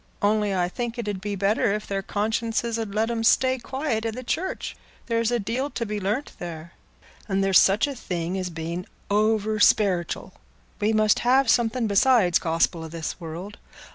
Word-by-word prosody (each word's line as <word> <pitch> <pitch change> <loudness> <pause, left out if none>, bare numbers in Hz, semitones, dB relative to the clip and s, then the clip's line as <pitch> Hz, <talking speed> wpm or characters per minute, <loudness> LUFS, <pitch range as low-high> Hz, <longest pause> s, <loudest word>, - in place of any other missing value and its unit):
Only 210 0 +2
I 180 -2 +1
think 235 +5 -4
it 235 -3 -4
'ud 200 -2 -3
be 205 0 -3
better 200 +1 +1
if 215 - -5
their 195 -1 -2
consciences 225 +3 -1
'ud 215 -3 -4
let 220 +2 +1
'em 230 -1 -2
stay 260 +3 +3
quiet 260 -3 -2
i' 225 - 0
the 250 +3 -6
church—there's 235 -7 -3
a 240 - +1
deal 235 +6 -2
to 235 - -3
be 210 -1 -3
learnt 210 +9 -2
there. 170 -1 -7 0.6
And 195 0 +1
there's 195 -1 +6
such 195 +3 +4
a 285 - -4
thing 175 -7 -4
as 185 -1 -2
being 170 +2 -5 0.2
oversperitial; 210 -3 +2 0.5
we 210 +1 +2
must 215 -1 +3
have 255 0 +4
something 240 0 +1
beside 205 -3 +4
Gospel 165 0 +1
i' - - -6
this 160 +1 -5
world. 175 +5 -7
210 Hz, 175 wpm, -25 LUFS, 190-230 Hz, 0.6 s, there's